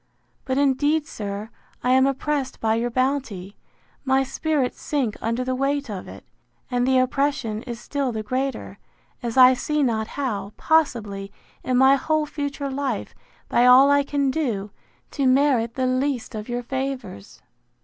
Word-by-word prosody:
But 260 0 -1
indeed, 290 +2 +2
sir, 205 -1 -6 0.3
I 250 - +2
am 260 +1 +5
oppressed 275 0 -2
by 220 -1 +1
your 235 +2 0
bounty; 240 -7 -2 0.5
my 265 0 +2
spirits 275 0 -1
sink 265 -8 -1
under 230 +3 -1
the 255 0 -2
weight 275 -1 -1
of 190 -3 -6
it; - - -11 0.5
and 245 0 +1
the 260 0 +4
oppression 255 -4 0
is 235 -1 -5
still 280 -3 -2
the 220 -1 -4
greater, 260 +4 -3 0.4
as 235 0 -4
I 255 0 +9
see 300 +3 -1
not 220 -4 0
how, 210 -7 -3
possibly, 215 -11 0 0.3
in 255 -1 +1
my 265 +2 +6
whole 310 +2 0
future 285 -2 -4
life, 265 -5 -3 0.3
by 245 +1 +3
all 265 +3 +7
I 285 0 +5
can 280 -1 0
do, 225 -9 -2 0.4
to 275 -3 0
merit 255 -3 +3
the 260 - 0
least 255 -1 -1
of 215 +1 -6
your 245 0 -2
favours. 265 - -5
260 Hz, 160 wpm, -23 LUFS, 230-280 Hz, 0.5 s, I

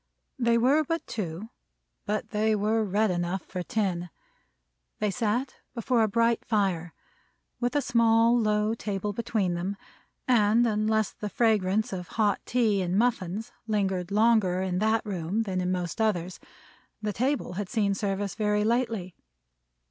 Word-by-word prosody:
They 235 -1 +3
were 270 +6 +4
but 330 +3 -3
two, 195 0 -5 0.6
but 215 +1 -2
they 215 +1 +2
were 215 +2 +1
red 210 +1 +1
enough 175 +1 -2
for 180 - -5
ten. 180 -2 -2 0.9
They 210 -1 0
sat 235 +5 -1 0.2
before 235 0 +1
a 220 - +4
bright 230 +2 +1
fire, 190 -6 -1 0.6
with 245 +3 -1
a 290 - +2
small 230 0 +4
low 215 -1 +2
table 205 -2 -3
between 205 -4 -1
them; 185 +4 -3 0.5
and 230 -1 +4
unless 215 -1 +1
the 210 - -5
fragrance 215 -2 +1
of 180 -2 -5
hot 210 -2 +2
tea 220 -5 +2
and 180 +1 0
muffins 220 -3 0 0.2
lingered 195 -4 0
longer 205 -4 +3
in 180 -1 -1
that 220 +1 +1
room 195 +2 -2
than 185 -3 -2
in 180 0 -1
most 180 +4 -2
others, 185 -5 0 0.6
the 210 -1 -1
table 260 +1 -1
had 195 0 -4
seen 205 -3 +1
service 195 0 -2
very 210 -1 +1
lately. 225 -5 -1
210 Hz, 150 wpm, -27 LUFS, 190-225 Hz, 0.9 s, were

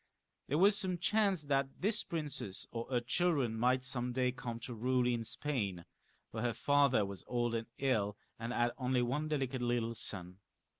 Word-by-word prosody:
There 145 - +1
was 200 +4 +6
some 190 -3 0
chance 195 -2 +2
that 140 -1 +1
this 210 +3 +1
princess 150 - -3
or 115 0 -4
her 125 -2 +1
children 135 -3 +1
might 125 +3 +2
some 125 -1 -2
day 125 0 +2
come 120 -2 -5
to 120 - -5
rule 125 +2 +1
in 120 -2 +1
Spain, 105 - -2 0.5
for 110 - -4
her 120 -2 0
father 140 -3 +4
was 100 -3 -7
old 120 -1 0
and 115 0 -2
ill, 105 -7 +1 0.2
and 115 +1 -3
had 120 0 +2
only 125 -1 +2
one 145 +6 -1
delicate 135 -4 -1
little 120 -1 0
son. 90 -4 -3
125 Hz, 180 wpm, -35 LUFS, 115-145 Hz, 0.5 s, was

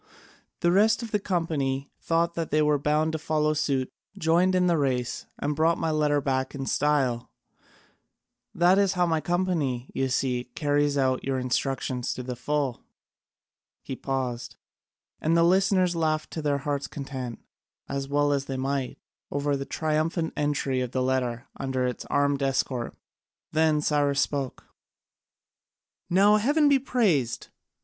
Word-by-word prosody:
The 175 - +3
rest 220 +5 +4
of 225 - -7
the 210 - +1
company 150 -8 -1
thought 170 +1 +1
they 155 -2 0
were 150 -1 +2
bound 150 +2 +1
to 160 - -3
follow 155 0 +1
suit, 135 -4 -1 0.2
joined 180 +1 +3
in 180 0 +3
the 170 -3 +2
race, 125 -4 -1
and 150 +1 -2
brought 165 +2 +3
my 160 - -1
letter 150 -1 +2
back 135 0 -1
in 135 -1 -4
style. 130 -5 +1 1.3
That 180 +3 +5
is 200 -1 +3
how 180 -1 +2
my 160 -2 +1
company, 165 -9 -1
you 135 0 0
see, 125 -1 0
carries 145 -1 +1
out 130 -1 +1
your 135 -1 -1
instructions 130 0 -1
to 125 - -5
the 125 0 -4
full." 135 0 -2 1.0
He 135 - -5
paused, 125 -3 -3 0.6
and 165 +2 +2
the 165 - +5
listeners 185 0 +3
laughed 155 -2 0
to 160 - -4
their 145 -1 +1
hearts' 140 0 -2
content, 130 -4 -6 0.5
as 140 0 -3
well 145 +1 +2
as 140 -1 -1
they 135 -1 -4
might, 135 0 -2 0.3
over 145 0 0
the 135 0 -4
triumphant 160 +2 -1
entry 140 -3 0
of 125 -1 -4
the 130 - +1
letter 125 -1 -1
under 130 -1 -1
its 125 -1 -3
armed 145 0 +1
escort. 135 -3 -1 0.6
Then 155 -1 +3
Cyrus 145 -2 +1
spoke: 140 -3 -2 1.5
"Now 200 +4 +5
heaven 290 +8 +3
be 280 -1 +5
praised! 195 - 0
145 Hz, 150 wpm, -26 LUFS, 135-165 Hz, 1.5 s, That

